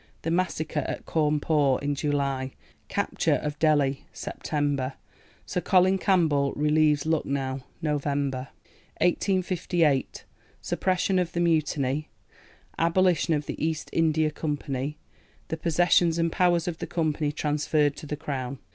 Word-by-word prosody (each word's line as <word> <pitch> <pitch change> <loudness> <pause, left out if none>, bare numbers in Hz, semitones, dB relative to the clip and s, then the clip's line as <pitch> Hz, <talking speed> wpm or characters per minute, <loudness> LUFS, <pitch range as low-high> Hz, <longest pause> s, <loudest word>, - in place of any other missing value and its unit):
The 165 - -1
massacre 165 -3 -1
at - - -5
Cawnpore 150 -3 +2
(July). 140 -2 -1 0.3
Capture - - 0
of 150 -1 -4
Delhi 145 -4 +2
(Sept.). 145 -3 -2 0.5
Sir 180 - -2
Colin 190 0 +4
Campbell 155 -9 +2
relieves 150 0 +2
Lucknow 140 -4 -1 0.2
(Nov.). 150 -2 0
1858. 160 +4 -1 0.3
Suppression 185 0 0
of 175 -2 -2
the 170 - -1
Mutiny. 155 -4 +1 0.7
Abolition 170 -1 +3
of 145 -1 -2
the - - -5
East 160 -1 -2
India 155 -1 +2
Company. 145 -2 -3 0.5
The 160 - -2
possessions 170 +1 +3
and 165 0 +1
powers 175 -1 +2
of 170 -2 -3
the - - -4
Company 155 -3 0
transferred 150 0 +1
to 150 - -8
the 150 - -3
Crown. 135 -2 -4
150 Hz, 120 wpm, -26 LUFS, 145-165 Hz, 0.7 s, Colin